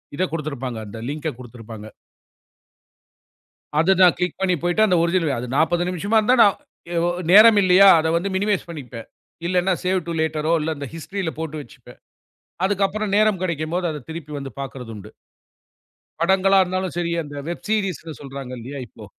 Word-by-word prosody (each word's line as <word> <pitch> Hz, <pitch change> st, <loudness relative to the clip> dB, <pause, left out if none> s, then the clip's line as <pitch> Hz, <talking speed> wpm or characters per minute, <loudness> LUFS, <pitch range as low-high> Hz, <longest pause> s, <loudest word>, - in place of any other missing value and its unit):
இதைக் 185 Hz, +3 st, -1 dB
குடுத்திருப்பாங்க. 140 Hz, -6 st, -4 dB
அந்த 105 Hz, +2 st, -9 dB
லிங்க் 155 Hz, +2 st, -4 dB
குடுத்திருப்பாங்க. 115 Hz, -3 st, -10 dB, 1.9 s
அது 165 Hz, +5 st, +4 dB
தான், 180 Hz, -2 st, +7 dB
க்ளிக் 180 Hz, 0 st, -2 dB
பண்ணி 190 Hz, -2 st, +2 dB
போயிட்டு, 175 Hz, +5 st, +2 dB
அந்த 180 Hz, -3 st, +2 dB
ஒர்ஜினல் 170 Hz, -1 st, +1 dB
இது 135 Hz, -, -1 dB
அது 125 Hz, -, -6 dB
40 175 Hz, +3 st, +2 dB
நிமிஷமா 195 Hz, +5 st, -1 dB
இருந்தால் 240 Hz, +2 st, +4 dB
நான் 205 Hz, -3 st, +4 dB, 0.5 s
ஒ -, -, +1 dB, 0.2 s
நேரம் 215 Hz, +1 st, +8 dB
இல்லையா? 185 Hz, +2 st, +7 dB
அதை 160 Hz, -, -1 dB
வந்து 175 Hz, +4 st, -1 dB
மினிமைஸ் 205 Hz, 0 st, 0 dB
பண்ணிப்பேன். 130 Hz, -8 st, -8 dB, 0.4 s
இல்லேன்னா 180 Hz, +1 st, +1 dB
சேவ் 185 Hz, 0 st, +1 dB
டூ 170 Hz, -, -3 dB
லேட்டர் 155 Hz, 0 st, -1 dB
இல்ல 160 Hz, +1 st, -2 dB
அந்த 140 Hz, -1 st, -6 dB
ஹிஸ்ட்ரில் 165 Hz, +1 st, -5 dB
போட்டு 160 Hz, -1 st, -5 dB
வச்சுப்பேன். 120 Hz, -, -16 dB, 0.7 s
அதுக்கப்புறம் 200 Hz, +1 st, -1 dB
நேரம் 215 Hz, -3 st, +3 dB
கிடைக்கும்போது 170 Hz, +1 st, -2 dB
அதை 150 Hz, -, -6 dB
திருப்பி 160 Hz, -2 st, -7 dB
வந்து 135 Hz, -1 st, -6 dB
பாக்குறதுண்டு. 125 Hz, -7 st, -8 dB, 1.1 s
படங்களா 190 Hz, +2 st, +3 dB
இருந்தாலும் 185 Hz, 0 st, -3 dB
சரி, 170 Hz, -1 st, -1 dB
அந்த 145 Hz, 0 st, -9 dB
வெப் 175 Hz, -, -6 dB
சீரியஸ்ன்னு 185 Hz, -7 st, -2 dB
சொல்றாங்க 135 Hz, -2 st, -8 dB
இல்லையா? 135 Hz, +5 st, -7 dB
இப்போ. 110 Hz, -, -13 dB
170 Hz, 155 wpm, -22 LUFS, 145-190 Hz, 1.9 s, நேரம்